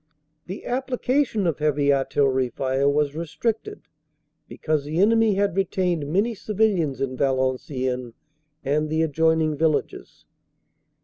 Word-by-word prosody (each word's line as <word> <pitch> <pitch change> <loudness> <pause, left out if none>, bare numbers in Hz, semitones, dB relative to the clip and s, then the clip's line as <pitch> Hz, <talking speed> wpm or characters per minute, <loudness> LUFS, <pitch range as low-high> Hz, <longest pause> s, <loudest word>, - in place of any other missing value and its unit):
"The 190 +3 -7
application 255 -3 0
of 165 -4 -1
Heavy 145 -1 +2
Artillery 135 -1 +1
fire 135 +3 0
was 145 0 +1
restricted 170 +8 -3 0.6
because 155 -2 -2
the 150 +3 -4
enemy 225 +1 +4
had 200 -2 0
retained 180 -5 -1
many 205 +7 +1
civilians 195 -9 0
in 130 -1 -2
Valenciennes 130 -2 -1 0.5
and 150 +3 0
the 160 +1 +1
adjoining 160 0 +1
villages. 155 0 -2
155 Hz, 115 wpm, -23 LUFS, 140-195 Hz, 0.6 s, enemy